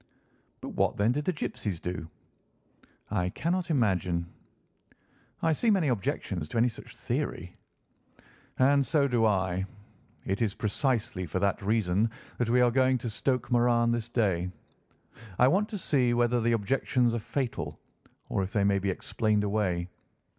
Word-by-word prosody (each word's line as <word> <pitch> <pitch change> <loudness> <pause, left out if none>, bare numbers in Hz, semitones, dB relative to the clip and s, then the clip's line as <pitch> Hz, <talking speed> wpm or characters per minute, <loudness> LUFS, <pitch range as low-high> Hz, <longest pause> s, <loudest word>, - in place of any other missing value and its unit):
"But - - -6
what, - - 0
then, 105 +3 +3
did 145 +3 -2
the - - +2
gipsies 105 - -4
do?" 90 -2 -5 1.0
"I 90 -4 0
cannot 175 - -1
imagine." 95 - +1 1.2
"I 165 -1 +3
see 230 +10 +1
many 190 -8 +3
objections 95 -7 -2
to - - -3
any 120 +2 +4
such 115 - -11
theory." 90 +2 -3 1.0
"And 140 +2 +4
so 140 0 +2
do 120 -4 +3
I. 95 -2 0 0.6
It 95 +4 -1
is 105 -3 0
precisely 110 - -1
for 80 - -3
that 100 +1 0
reason 105 0 +1 0.3
that 120 -2 +1
we 125 +1 +4
are 120 -1 +4
going 130 +1 +3
to 120 -1 -4
Stoke 125 +4 -1
Moran 120 -1 +3
this 120 -1 -2
day. 95 -7 +1 0.9
I 125 - +6
want 200 +9 +2
to 210 - -4
see 130 -9 +1
whether 120 0 +2
the 115 +1 +2
objections 120 +2 +1
are 120 - 0
fatal, 125 +2 -3 0.5
or - - -1
if 95 +1 -3
they 100 - +2
may 100 0 +3
be 100 +1 -1
explained 105 +2 0
away. 100 -4 0
115 Hz, 155 wpm, -29 LUFS, 100-130 Hz, 1.2 s, I